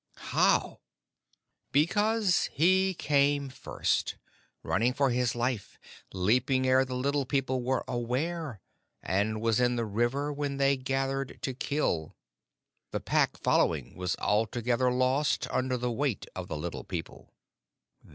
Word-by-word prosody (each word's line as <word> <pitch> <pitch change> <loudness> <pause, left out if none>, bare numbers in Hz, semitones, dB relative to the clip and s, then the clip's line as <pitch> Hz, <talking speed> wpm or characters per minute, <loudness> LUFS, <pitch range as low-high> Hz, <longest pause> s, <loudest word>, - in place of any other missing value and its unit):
"How?" - - +2 0.9
"Because 205 +6 +2
he 185 +4 +3
came 140 -2 +2
first, 130 - -1 0.5
running 120 +3 +1
for 140 -2 +2
his 120 -1 0
life, 120 -4 -2 0.3
leaping 125 +8 +2
ere 130 +1 +4
the 130 -1 -5
Little 140 +2 0
People 130 -1 -1
were 130 +1 0
aware, 130 - -2 0.4
and 105 +4 0
was 115 0 +2
in 125 0 +2
the 115 -1 -1
river 120 +7 0
when 140 -1 -3
they 140 0 +3
gathered 135 0 -2
to 130 - -1
kill. 125 - -1 0.7
The - - -3
Pack, - - +1
following, 70 -7 +1
was 90 -1 -2
altogether 120 +4 +1
lost 130 +4 +1
under 130 0 0
the 125 0 -2
weight 125 -2 -1
of - - -5
the - - -4
Little - - -5
People." - - -7
130 Hz, 130 wpm, -29 LUFS, 120-140 Hz, 0.9 s, ere